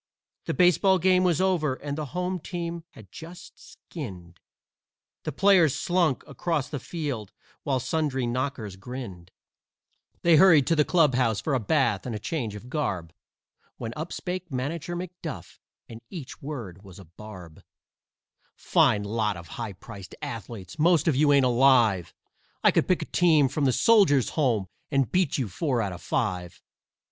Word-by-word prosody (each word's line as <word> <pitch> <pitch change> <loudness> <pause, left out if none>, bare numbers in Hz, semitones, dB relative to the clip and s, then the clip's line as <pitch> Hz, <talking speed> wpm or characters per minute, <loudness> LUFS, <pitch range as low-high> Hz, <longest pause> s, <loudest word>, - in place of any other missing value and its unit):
The - - -2
baseball 185 +2 +4
game 185 +1 +3
was 175 -4 +2
over 175 -8 +1
and 145 +1 -5
the 155 -1 -4
home 180 0 -1
team 170 0 -5
had 105 -4 -14
been 165 +2 -10
skinned, 95 - -11 0.9
The 155 - -2
players 175 -3 +4
slunk 170 -3 +1
across 150 0 -2
the 145 - -4
field 140 - -5 0.3
while 135 -2 0
sundry 140 -3 -1
knockers 120 -5 -3
grinned; 95 -5 -8 0.9
They 170 -2 +6
hurried 160 -6 +6
to 165 - +2
the 150 - +4
clubhouse 130 - +2
for 150 - -2
a 130 - +2
bath 120 -4 +1
and 110 -3 -4
change 115 -4 -3
of 105 +4 -10
garb, 100 - -3 0.6
When 115 - -5
up 155 +3 -5
spake 180 -2 -5
Manager 150 +7 -3
McDuff, 175 -4 -7 0.3
and 115 0 -11
each 155 -8 -9
word 120 - -7
was 95 -3 -14
a 95 - -12
barb: 90 -2 -12 0.9
"Fine 105 -1 +2
lot 105 -1 -1
of 85 -1 -11
high 115 -4 -5
priced 95 0 -11
athletes! 110 - -7
Most 170 -1 +3
of 155 - +3
you 145 +2 +4
ain't 140 -2 +5
alive! 120 - +3 0.5
I - - +6
could - - +1
pick 185 - +1
a - - -7
team 160 -6 +3
from 145 +1 -1
the 130 - +4
Soldiers' 175 - +4
Home 120 -10 0 0.2
And 135 -4 +1
beat 185 -5 +1
you 130 -5 -1
four 125 - -1
out 100 -4 -2
of 90 - -10
five. 90 -1 -2
135 Hz, 160 wpm, -26 LUFS, 110-165 Hz, 0.9 s, They